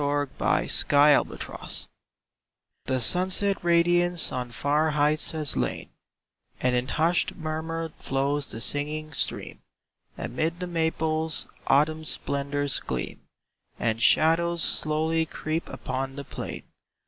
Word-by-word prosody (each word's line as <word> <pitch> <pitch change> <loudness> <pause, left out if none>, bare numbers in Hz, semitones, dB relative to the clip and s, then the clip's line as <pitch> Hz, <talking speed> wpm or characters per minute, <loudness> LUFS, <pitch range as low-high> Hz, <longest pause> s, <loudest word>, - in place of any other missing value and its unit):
Xove'8 145 -1 +1
Hftetnoon 145 0 +2 1.0
HE 130 0 +1
sunset 185 - +2
radiance 175 0 +2
on 125 -1 -3
far 145 +7 +1
heights 150 +1 +2
has 155 -3 -1
lain 60 -2 -2 0.7
And 125 0 +1
in 125 +1 0
hushed 170 +5 +1
murmur 160 0 -4
flows 140 +1 0
the 115 - -6
singing 150 +4 -1
stream; - - -2 0.6
Amid 165 +2 -2
the 180 - -2
maples 160 -2 -1 0.2
Autumn 155 +3 +3
splendors 140 -1 0
gleam, 65 -2 -5 0.6
And 115 0 0
shadows 170 +4 +4
slowly 160 +1 0
creep 155 +1 -3
upon 135 +1 -4
the 140 - -6
plain. - - -7
155 Hz, 110 wpm, -26 LUFS, 140-165 Hz, 1.0 s, shadows